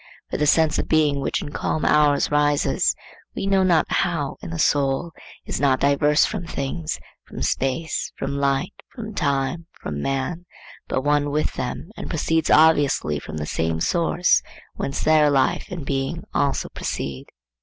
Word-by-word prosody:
For - - -1
the 150 - +1
sense 160 +1 +3
of - - -2
being 150 -3 +2
which 135 - -1
in 145 - -7
calm 155 - -2
hours 150 -1 +3
rises, 145 0 +2 0.4
we - - -3
know 195 -1 +3
not 175 -4 +3
how, 165 -7 0
in - - -7
the 165 - -4
soul, 145 +1 +1 0.3
is - - -3
not 135 -2 +3
diverse 145 +2 +3
from 180 -6 -4
things, 155 +4 -3 0.3
from - - -6
space, 155 +5 -1
from 140 +1 -3
light, 140 +5 0 0.2
from 220 -4 -6
time, 145 0 -1
from 75 -1 -5
man, 135 - -2 0.4
but 130 - -1
one 145 0 +2
with 150 +1 -1
them 145 +8 -5
and - - -7
proceeds 160 0 0
obviously 145 - +4
from 80 - -8
the 75 - -3
same 80 +1 -1
source 170 - +2 0.3
whence 135 - -3
their 155 -1 +5
life 135 -2 +1
and 175 -6 -6
being 135 +5 -2
also 140 -1 0
proceed. 70 -1 -5
145 Hz, 165 wpm, -23 LUFS, 135-165 Hz, 0.4 s, their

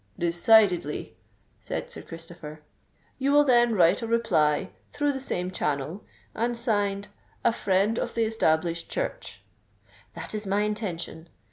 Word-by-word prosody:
"Decidedly," 175 -1 +3 0.4
said - - -5
Sir - - -7
Christopher. 165 -2 -10 0.6
"You 275 +1 +1
will 290 +1 +6
then 240 -4 +4
write 180 +3 +4
a 230 - -3
reply, 190 -11 +1 0.2
through 290 0 0
the 265 - -5
same 180 -8 -2
channel, 150 +3 -2 0.3
and 235 +2 -1
signed 205 -4 0 0.4
'A - - +5
Friend 200 +2 +1
of - - -3
the 230 - +2
Established 170 -6 0
Church.'" - - -4 0.7
"That - - -6
is 210 -1 -4
my 200 +2 +1
intention. 185 -6 -4
200 Hz, 135 wpm, -26 LUFS, 170-230 Hz, 0.7 s, will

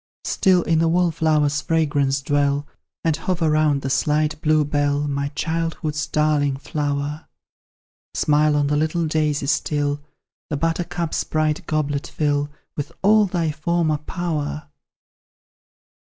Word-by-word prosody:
Still 185 -3 +3
in 165 0 +2
the 165 - +3
wallflower's 160 -4 +2
fragrance 145 -4 +1
dwell; 145 0 +1 0.4
And 160 -2 +2
hover 165 -1 0
round 150 -2 +2
the 135 - -2
slight 150 +2 +1
bluebell, 145 -1 +1
My 140 0 -1
childhood's 160 -2 -2
darling 150 -3 +1
flower. 145 +1 -3 0.9
Smile 150 0 +3
on 145 -1 +2
the 145 +1 +1
little 160 +2 0
daisy 150 -2 0
still, 145 0 0 0.5
The 150 - -1
buttercup's 170 +1 -1
bright 155 +1 -1
goblet 145 -2 -1
fill 145 -1 0 0.3
With 145 - -4
all 210 +1 +5
thy 170 -4 0
former 155 0 0
power. 150 - -4
150 Hz, 120 wpm, -22 LUFS, 145-160 Hz, 0.9 s, all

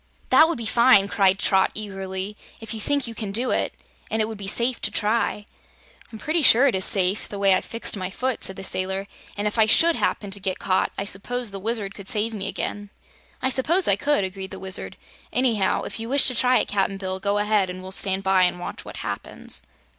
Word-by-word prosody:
"That 315 - +7
would 335 - -2
be 230 - -5
fine," 235 -3 +5
cried 195 -2 +3
Trot 190 -1 +2
eagerly, 195 -1 -4 0.2
"if 225 0 -6
you 220 - -5
think 285 +4 0
you 230 - -7
can 210 -2 -5
do 240 +5 +1
it, - - 0 0.3
and 220 - -1
it 215 - +1
would 220 - -6
be 195 - -6
safe 235 +5 +1
to - - 0
try!" 210 -1 -1 0.7
"I'm 220 - -8
pretty 315 +8 -1
sure 255 -1 +6
it 270 - +3
is 190 0 +3
safe, 195 -1 +2
the 205 - -6
way 200 -1 +4
I've 185 - +1
fixed 230 -1 -3
my 185 -2 -4
foot," 255 +5 -3
said 190 - -1
the 195 - -8
sailor, 190 +1 -2 0.3
"an' 205 - -2
if 210 +2 -1
I 220 - +5
SHOULD 330 +9 +6
happen 200 -2 -1
to 200 - -2
get 190 -1 -2
caught, 185 -1 0
I 195 - -2
s'pose 230 +4 -3
the 195 - -5
Wizard 210 -1 -2
could 200 -1 -10
save 225 -1 0
me 200 -2 -4
again." 205 0 -4 0.5
"I 260 - +1
suppose 330 +9 +2
I 200 - +5
could," 285 +1 +1
agreed 190 0 -5
the - - -8
Wizard. 190 0 -4 0.3
"Anyhow, 230 -7 +1
if - - -4
you 225 +1 -6
wish 280 +1 +3
to 255 - -3
try 250 +1 +4
it, - - 0
Cap'n 195 -1 -1
Bill, 190 -1 -4
go 200 +1 0
ahead 205 -2 +1
and 185 +1 -7
we'll 190 - -8
stand 190 0 0
by 190 -1 +3
and 180 0 +2
watch 175 - -7
what - - -10
happens." - - -4
205 Hz, 235 wpm, -23 LUFS, 195-235 Hz, 0.7 s, That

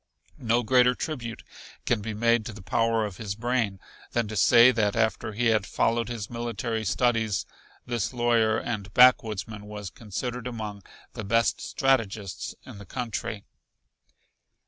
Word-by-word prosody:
No 120 +1 +1
greater 125 +2 +4
tribute 120 -8 -5 0.4
can 115 -3 +1
be 110 +1 -4
made 115 +1 +2
to 115 - -6
the 105 -1 -11
power 115 +3 +1
of 100 -3 -7
his 100 -3 -4
brain 115 -4 -1 0.3
than 120 -2 +1
to 110 - -5
say 120 +5 +7
that 105 -4 0
after 110 -1 0
he 120 +4 -1
had 105 -2 0
followed 115 +1 0
his 115 -4 -4
military 115 -1 -3
studies 115 -3 +1 0.4
this 120 -4 -2
lawyer 120 -3 +2
and 105 -5 -4
backwoodsman 110 -4 +4
was 105 -2 -7
considered 120 +3 -5
among 105 -4 -6 0.3
the - - -6
best 115 +3 +1
strategists 110 - -1
in 100 - -10
the 100 - -10
country. 115 -3 -4
115 Hz, 145 wpm, -26 LUFS, 105-120 Hz, 0.4 s, say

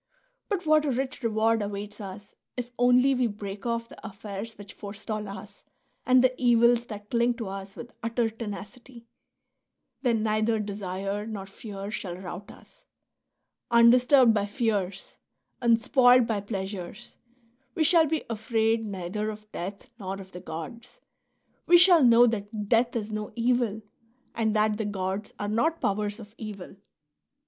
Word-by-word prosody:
But 385 -5 -2
what 310 -1 +4
a - - 0
rich 260 +2 -3
reward 225 -1 +2
awaits 205 +1 -5
us 200 +1 -9 0.2
if 245 -1 -4
only 250 +2 +5
we 250 -2 +2
break 205 0 -6
off 230 0 -1
the - - -15
affairs 210 +1 -7
which 205 0 -11
forestall 210 +1 -6
us 200 +1 -10 0.4
and 255 0 +6
the 255 0 +4
evils 240 0 +4
that 210 -2 -9
cling 235 0 +2
to 230 -3 -5
us 195 0 -7
with 240 0 -9
utter 230 0 0
tenacity! 230 +2 -9 1.0
Then 230 -5 +1
neither 215 +1 +1
desire 200 0 -4
nor 205 -3 -5
fear 200 0 -8
shall 180 -5 -4
rout 185 +1 -8
us. - - -17 0.8
Undisturbed 245 +1 +6
by 205 -1 0
fears, 205 -5 -2 0.4
unspoiled 245 +1 +5
by 220 -3 -1
pleasures, 195 0 -6 0.6
we 320 - +2
shall 325 0 +5
be 315 0 -1
afraid 225 0 0
neither 200 +1 -3
of 215 0 -9
death 195 +3 -6
nor 195 -1 -5
of 190 -1 -11
the 180 - -9
gods; 230 - -8 0.7
we 350 - +8
shall 350 -3 +7
know 240 0 +7
that 210 -2 -2
death 235 +1 +3
is 220 -2 -3
no 215 0 -4
evil 235 -3 0 0.5
and 220 -1 0
that 215 0 +2
the 220 - -1
gods 195 0 -3
are 205 - -3
not 305 +11 +1
powers 205 +1 -1
of 210 -2 -12
evil. 205 -5 -8
220 Hz, 150 wpm, -27 LUFS, 200-240 Hz, 1.0 s, we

